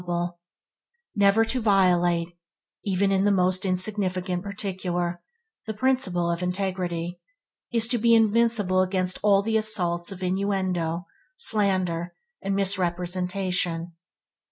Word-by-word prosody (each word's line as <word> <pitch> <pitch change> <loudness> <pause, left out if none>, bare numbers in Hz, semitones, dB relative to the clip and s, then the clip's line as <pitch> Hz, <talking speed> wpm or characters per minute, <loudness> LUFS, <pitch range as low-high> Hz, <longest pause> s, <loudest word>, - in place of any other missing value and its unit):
Never 205 +2 +4
to 250 +3 -1
violate, 175 -4 +2 0.5
even 195 0 0
in 195 0 +2
the 205 - +3
most 185 0 +1
insignificant 185 -1 0
particular, 185 -3 -4 0.5
the 220 - -4
principle 205 -9 0
of 170 +1 -3
integrity, 180 -2 -3 0.5
is 230 -2 +2
to 240 - +2
be 230 +1 +4
invincible 220 -4 +2
against 185 -1 0
all 200 -1 +3
the 220 +1 +1
assaults 180 -5 +1
of 190 -1 -8
innuendo, 185 -3 -1 0.3
slander, 185 - +1 0.3
and 195 0 -2
misrepresentation. 180 -2 -1
185 Hz, 110 wpm, -25 LUFS, 180-205 Hz, 0.5 s, Never